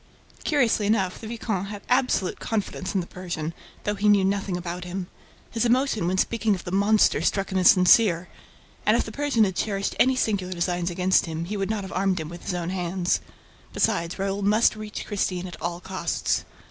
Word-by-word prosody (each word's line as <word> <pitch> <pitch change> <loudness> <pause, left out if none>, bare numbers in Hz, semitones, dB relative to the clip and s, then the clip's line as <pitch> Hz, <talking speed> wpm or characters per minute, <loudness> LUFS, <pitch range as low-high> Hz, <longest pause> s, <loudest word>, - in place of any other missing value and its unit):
Curiously 240 -8 +2
enough, 195 -4 0
the 220 - -7
viscount 220 -4 -3
had 205 -1 -7
absolute 250 -7 +1
confidence 200 -3 -3
in 190 - +2
the - - -6
Persian, 170 -3 -5 0.3
though 210 - 0
he 210 +1 +1
knew 200 -2 +5
nothing 195 -2 -1
about 175 0 -5
him. 180 +1 -4 0.5
His 230 - 0
emotion 240 -5 +2
when 185 +1 0
speaking 225 +1 +1
of 180 - -8
the 175 - -6
"monster" 205 +3 +3
struck 195 -1 0
him 190 - +1
as 180 - +7
sincere; 180 -1 +5 0.6
and, - - +4
if - - +1
the - - -8
Persian 285 -6 +2
had 190 -3 0
cherished 200 -1 -1
any 260 0 +5
sinister 200 -7 0
designs 175 0 -1
against 180 +1 +2
him, 165 +1 -4
he 205 +4 -4
would 195 0 -2
not 215 -2 -2
have 190 - -7
armed 190 0 +1
him 155 -1 -5
with 170 0 -9
his 180 - -2
own 175 0 -3
hands. 180 -1 0 0.5
Besides, 180 -6 0
Raoul 195 +1 -2
must 210 +3 +3
reach 215 -1 -6
Christine 185 -3 -2
at 180 - -9
all 175 0 -3
costs. 190 +1 -2
195 Hz, 200 wpm, -25 LUFS, 180-215 Hz, 0.6 s, as